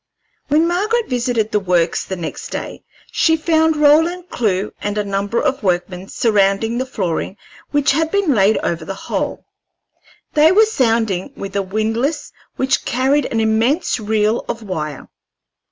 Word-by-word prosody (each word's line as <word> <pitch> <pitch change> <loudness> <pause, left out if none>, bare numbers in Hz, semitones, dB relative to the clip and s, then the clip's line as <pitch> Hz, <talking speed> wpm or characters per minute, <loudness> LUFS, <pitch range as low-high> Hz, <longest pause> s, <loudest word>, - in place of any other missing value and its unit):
When 310 +3 +3
Margaret 430 +7 0
visited 240 -3 0
the 210 - +2
Works 180 -3 +1
the 190 - -4
next 170 -3 -6
day - - -6 0.3
she 320 -1 +3
found 320 0 +2
Roland 325 +5 +3
Clewe 205 - -1
and 205 0 -3
a 210 - +1
number 200 +3 -1
of 275 -2 0
workmen 180 -1 -2
surrounding 215 +2 +1
the 260 - -2
flooring 190 -4 -3 0.3
which 290 -1 +2
had 320 +3 +1
been 400 -5 +1
laid 210 -1 +3
over 165 -1 -2
the 195 +4 -6
hole. - - -4 0.9
They 310 +2 +5
were 430 +4 +6
sounding 225 - 0
with 195 0 -7
a 200 - +2
windlass 225 - -2 0.2
which 265 0 0
carried 270 +4 +1
an 225 - -2
immense 225 +9 +1
reel 215 +1 0
of 230 - -4
wire. 155 -8 -5
225 Hz, 155 wpm, -18 LUFS, 195-295 Hz, 0.9 s, were